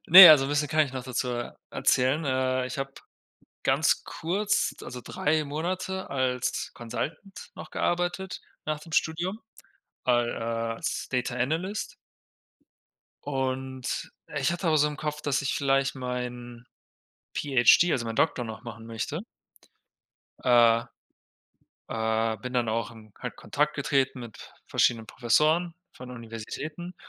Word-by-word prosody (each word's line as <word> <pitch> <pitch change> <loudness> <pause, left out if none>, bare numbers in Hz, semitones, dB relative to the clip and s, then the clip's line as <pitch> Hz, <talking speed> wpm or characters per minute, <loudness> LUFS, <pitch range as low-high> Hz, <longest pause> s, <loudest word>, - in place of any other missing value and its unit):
Ne, 185 +2 +13
also 140 -3 +7
'n - - -2
bisschen 145 0 +1
kann 155 +1 +3
ich 130 - -10
noch 130 -2 -5
dazu 125 0 -2
er 120 -1 -4
erzählen, 130 +5 +2
äh, 130 -1 +1
ich 130 - -6
habe 135 0 -3 0.7
ganz - - +3
kurz, 205 +5 0
also, 125 - -7
3 155 +1 0
Monate 185 +6 -3
als 130 -2 -1
Consultant 155 - -6
noch - - -9
gearbeitet, 175 +2 -1 0.2
nach 155 -1 -2
dem 165 0 -13
Studium 175 +8 0 0.6
al 120 -1 +3
äh, 115 0 -2
als 155 - -3
Data 125 -1 -1
Analyst. 165 - -2 1.3
Und 130 -2 -3 0.3
ich - - +1
hatte 175 0 -2
auch 155 - +4
so 150 0 +4
im 150 - -6
Kopf, 150 -1 -3
dass 145 -2 +1
ich 140 - -1
vielleicht 135 0 +2
meinen 125 -1 -5 0.7
PhD, 140 +5 +5
also 115 -5 0
meinen 115 - -4
Doktor 125 -5 +1
noch 110 +1 -8
machen 115 -1 -9
möchte. 115 +8 -4 1.2
Äh. 120 -2 +5 1.0
Äh, 110 0 0
bin 125 +4 -7
dann 120 -3 +1
auch 115 -1 -1
in 110 -2 -15
Ko - - -6
Kontakt 150 +1 0
getreten 135 -2 0
mit 115 -4 -11
verschiedenen 115 -2 +2
Professoren 155 +9 +2 0.2
von 125 0 -10
Universitäten, 125 +9 -7
130 Hz, 135 wpm, -27 LUFS, 120-155 Hz, 1.3 s, Ne